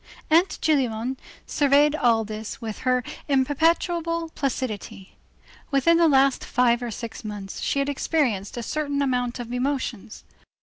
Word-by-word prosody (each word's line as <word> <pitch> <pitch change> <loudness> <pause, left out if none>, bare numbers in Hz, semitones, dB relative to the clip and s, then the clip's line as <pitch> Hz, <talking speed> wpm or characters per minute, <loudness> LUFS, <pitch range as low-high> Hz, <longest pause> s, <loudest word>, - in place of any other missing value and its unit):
Aunt 340 +4 +4
Gillenormand 260 -4 +1 0.3
surveyed 290 +1 +3
all 230 -6 +2
this 215 +1 -6
with 220 -3 -6
her 255 -1 +1 0.2
imperturbable 330 +4 +1
placidity. 235 -8 -4 0.5
Within 295 +4 +3
the 335 -1 +5
last 275 -2 +3
five 240 -1 +2
or 240 - -3
six 230 +1 -7
months 205 -2 -6
she - - -1
had 275 0 +1
experienced 265 - -1
a 240 - -3
certain 285 +1 -1
amount 250 -2 -1
of 240 0 -6
emotions. 250 -5 -3
260 Hz, 135 wpm, -24 LUFS, 230-290 Hz, 0.5 s, the